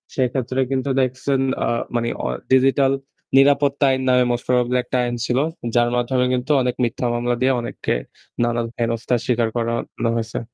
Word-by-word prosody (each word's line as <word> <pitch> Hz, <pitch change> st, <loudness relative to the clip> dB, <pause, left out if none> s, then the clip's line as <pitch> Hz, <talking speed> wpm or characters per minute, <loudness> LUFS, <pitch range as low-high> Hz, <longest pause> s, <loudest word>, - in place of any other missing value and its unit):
সেক্ষেত্রে 130 Hz, 0 st, -1 dB
কিন্তু 135 Hz, +1 st, -1 dB
দেখসেন 130 Hz, +1 st, 0 dB, 0.2 s
আ -, -, 0 dB, 0.3 s
মানে 115 Hz, 0 st, 0 dB, 0.2 s
অ -, -, 0 dB, 0.2 s
ডিজিটাল 135 Hz, +1 st, +4 dB, 0.4 s
'নিরাপত্তা 140 Hz, +1 st, +4 dB
আইন' 130 Hz, 0 st, -1 dB
নামে 125 Hz, 0 st, +4 dB
মোস্ট 120 Hz, -, -2 dB
প্রবাবলি 125 Hz, 0 st, +2 dB
একটা 130 Hz, -, -2 dB
আইন 120 Hz, 0 st, -2 dB
ছিল। 120 Hz, -, 0 dB, 0.4 s
যার 120 Hz, 0 st, +4 dB
মাধ্যমে 125 Hz, +1 st, +1 dB
কিন্তু 125 Hz, +3 st, -1 dB
অনেক 125 Hz, -1 st, -1 dB
মিথ্যা 120 Hz, +1 st, -1 dB
মামলা 120 Hz, 0 st, 0 dB
দিয়ে 130 Hz, +1 st, +3 dB
অনেককে 120 Hz, -, -3 dB, 0.5 s
নানান 120 Hz, -1 st, 0 dB
হেনস্তার 115 Hz, +1 st, 0 dB
স্বীকার 120 Hz, -2 st, +1 dB
করানো 115 Hz, 0 st, -2 dB
হইসে। 115 Hz, 0 st, -3 dB
125 Hz, 160 wpm, -21 LUFS, 120-130 Hz, 0.5 s, ডিজিটাল